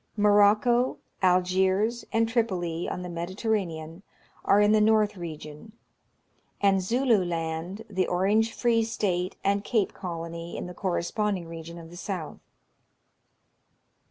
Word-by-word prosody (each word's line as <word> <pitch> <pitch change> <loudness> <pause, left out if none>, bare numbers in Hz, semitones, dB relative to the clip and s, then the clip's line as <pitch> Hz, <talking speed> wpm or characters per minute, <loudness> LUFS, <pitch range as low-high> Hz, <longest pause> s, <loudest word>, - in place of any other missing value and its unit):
Morocco, 210 +4 +4 0.2
Algiers, 190 +5 +2
and 225 0 +2
Tripoli, 185 -8 -1
on 180 - -4
the - - -5
Mediterra 185 +5 -1
nean, 160 +2 -8 0.4
are 200 - +4
in 210 0 +5
the 215 0 +4
north 215 -1 +3
region; 160 +2 -8 0.9
and 195 -1 +3
Zulu 230 +1 +2
Land, 170 +4 -4
the 190 -3 -1
Orange 205 +5 +2
Free 230 -1 +2
State, 190 -5 -1
and 200 +1 +1
Cape 215 -3 0
Colony, 170 -1 -6
in - - -4
the 180 - -7
corresponding 185 +1 -1
region 165 0 -8
of 165 -1 -11
the 175 - -10
south. 180 -4 -5
190 Hz, 130 wpm, -27 LUFS, 170-215 Hz, 0.9 s, in